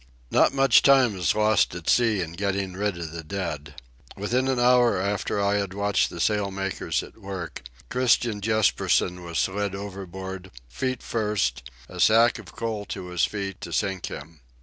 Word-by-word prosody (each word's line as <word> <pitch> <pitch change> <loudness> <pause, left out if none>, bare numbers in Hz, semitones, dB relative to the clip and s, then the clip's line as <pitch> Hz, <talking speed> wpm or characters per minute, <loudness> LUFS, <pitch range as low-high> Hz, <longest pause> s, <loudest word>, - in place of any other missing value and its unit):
Not - - +4
much 135 0 +5
time 130 -6 +5
is 90 -2 +1
lost 110 -4 +2
at 85 -2 -8
sea 115 -5 +3
in 80 -2 -4
getting 100 0 -2
rid 100 -1 -2
of 85 -2 -6
the 85 0 -7
dead. 75 -5 -5 0.4
Within 120 +6 0
an 130 -2 +1
hour 120 -4 +4
after 100 +1 -1
I 100 0 +2
had 100 -2 -3
watched 100 0 +1
the 85 - -8
sail 105 +2 +1
makers 95 0 -2
at - - -14
work 95 -5 -6 0.3
Christian 120 -4 +2
Jespersen 100 -4 +1
was 85 -1 -5
slid 100 0 -1
overboard, 95 -1 -7 0.2
feet 130 - -3
first, 100 - -1 0.2
a - - -10
sack 115 +2 +5
of - - -13
coal 110 -3 -3
to 90 - -6
his 90 -1 +2
feet 100 -3 -5
to - - -7
sink 95 -2 -1
him. 80 +2 -9
100 Hz, 170 wpm, -25 LUFS, 90-110 Hz, 0.4 s, much